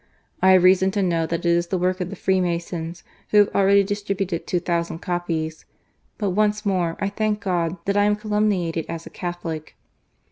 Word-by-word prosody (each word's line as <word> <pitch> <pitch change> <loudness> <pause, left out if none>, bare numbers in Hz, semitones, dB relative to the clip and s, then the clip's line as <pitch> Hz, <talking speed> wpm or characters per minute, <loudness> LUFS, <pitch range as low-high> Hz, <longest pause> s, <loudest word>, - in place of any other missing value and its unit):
I 190 0 +6
have 185 -1 +5
reason 190 +1 +5
to 200 - +2
know 165 -3 +1
that 170 +1 -3
it - - +3
is 170 0 +2
the 185 - -1
work 185 +1 0
of 180 - -2
the 200 - -6
Free 190 -1 +1
masons, 170 -1 -3 0.3
who 210 -1 +6
ha\e - - -8
already 200 0 +5
distributed 195 -3 -3
two 180 - +1
thousand 170 -1 -2
copies. 165 -2 -3 0.5
But 205 -3 -1
once 210 +2 +1
more 180 -4 0
I 200 - 0
thank 210 +1 -1
God 175 -3 -1
that 200 - 0
I 205 - +4
am 210 0 +3
calumniated 210 -6 0
as 165 0 -5
a - - -10
Catholic." 175 -3 -5
185 Hz, 200 wpm, -23 LUFS, 170-200 Hz, 0.5 s, I